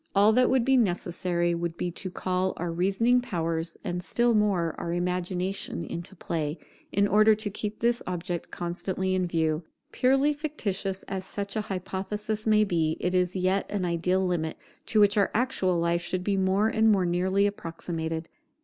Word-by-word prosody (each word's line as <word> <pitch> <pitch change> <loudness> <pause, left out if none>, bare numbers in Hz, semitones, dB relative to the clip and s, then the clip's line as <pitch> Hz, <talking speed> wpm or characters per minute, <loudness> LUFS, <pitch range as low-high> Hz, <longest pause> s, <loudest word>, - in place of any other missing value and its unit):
All 205 +2 +6
that 250 +2 +4
would 260 -3 +3
be 265 0 +4
necessary 175 -4 0
would 170 0 -3
be 175 - -2
to 185 +2 -4
call 185 +1 -1
our 175 0 -2
reasoning 200 +8 +2
powers, 165 -6 -2
and 180 -3 -3
still 240 +5 +2
more, 195 -7 +2
our 170 - -3
imagination 180 0 -2
into 175 +5 -6
play, 155 -2 -3 0.3
in 200 +1 +3
order 215 +1 +5
to 210 -1 -4
keep 210 +1 -4
this 235 +1 +2
object 175 -1 -3
constantly 185 +2 -2
in 185 -1 +1
view. 160 -2 0 0.3
Purely 270 +3 +3
fictitious 205 - -3
as 190 -1 -4
such 200 +2 -4
an 215 - +1
hypothesis 210 +2 -4
may 215 0 +5
be, 165 -5 0
it 180 - -1
is 180 0 +1
yet 185 +1 +1
an 200 -3 -1
ideal 180 +2 +1
limit, 165 -3 -1 0.3
to 220 - +3
which 205 +1 +5
our 200 - +4
actual 210 -7 +1
life 170 0 +1
should 180 +1 -2
be 200 +1 +1
more 190 +2 +2
and 220 0 +3
more 190 -3 +3
nearly 185 +3 +2
approximated. 165 -4 -3
185 Hz, 175 wpm, -27 LUFS, 175-210 Hz, 0.3 s, All